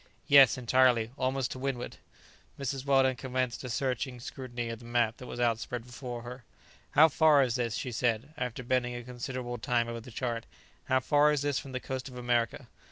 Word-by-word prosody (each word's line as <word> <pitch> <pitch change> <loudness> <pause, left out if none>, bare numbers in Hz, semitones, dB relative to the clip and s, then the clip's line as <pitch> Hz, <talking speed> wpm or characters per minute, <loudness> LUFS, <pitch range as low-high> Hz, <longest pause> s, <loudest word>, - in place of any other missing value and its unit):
"Yes, 140 -3 +7
entirely; 125 -2 +3
almost 130 -1 -1
to 130 - -6
windward." 130 -2 -3 0.6
Mrs. 135 -1 -3
Weldon 135 -1 +4
commenced 130 0 -2
a 125 - -5
searching 130 +1 -2
scrutiny 120 -1 -5
of 115 -1 -5
the 120 - -13
map 120 -1 +1
that 125 - -10
was - - -7
outspread 120 0 -1
before 125 -1 -7
her. 125 +1 -8 0.5
"How 160 - +9
far 155 -2 +5
is 125 -3 0
this," 120 -3 -1
she 125 - -3
said, 120 +4 -1
after 125 -3 -4
bending 125 0 0
a 120 - -6
considerable 125 0 -5
time 120 -1 +1
over 115 0 -4
the 125 - -12
chart; 115 -1 -3 0.4
"how 130 0 +2
far 145 +3 +4
is 145 -2 0
this 145 -2 0
from 135 - -9
the 130 - -2
coast 130 +1 -5
of 125 - -11
America?" 120 -1 0
125 Hz, 195 wpm, -30 LUFS, 120-130 Hz, 0.6 s, How